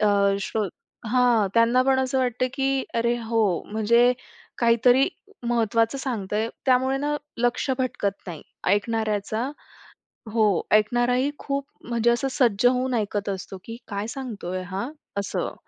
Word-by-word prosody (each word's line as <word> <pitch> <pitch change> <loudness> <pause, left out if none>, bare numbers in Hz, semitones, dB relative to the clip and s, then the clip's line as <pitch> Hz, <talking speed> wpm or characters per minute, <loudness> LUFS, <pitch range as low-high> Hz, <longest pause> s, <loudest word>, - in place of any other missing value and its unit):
अ, 210 - +3 0.3
show 215 +2 -1 0.5
हां, 245 -5 +4
त्यांना 235 +2 +4
पण 265 0 +3
असं 260 0 0
वाटतं, 250 0 +1
की 270 -1 0
"अरे, 235 +1 +1
हो, 225 -1 0 0.3
म्हणजे 235 +3 +4 0.5
काहीतरी 245 +3 +4 0.4
महत्त्वाचं 230 +2 +1
सांगतंय." 220 -4 -2 0.2
त्यामुळे 260 +1 +3
ना 295 +1 -1 0.2
लक्ष 245 +3 +1
भटकत 205 -6 -1
नाही 165 -4 -7 0.3
ऐकणाऱ्याचा. 220 +3 -1 0.8
हो, 225 -2 +4 0.3
ऐकणाराही 240 +5 +3
खूप 275 0 -2 0.2
म्हणजे 235 0 +2
असं 240 +3 0
सज्ज 235 -2 +3
होऊन 255 +1 +3
ऐकत 205 -2 -1
असतो, 190 0 -5
की 230 0 -7
काय 200 0 -3
सांगतोय 200 -8 -4
हां? 195 +7 -4 0.3
असं. 200 - -3
235 Hz, 130 wpm, -24 LUFS, 215-255 Hz, 0.8 s, हां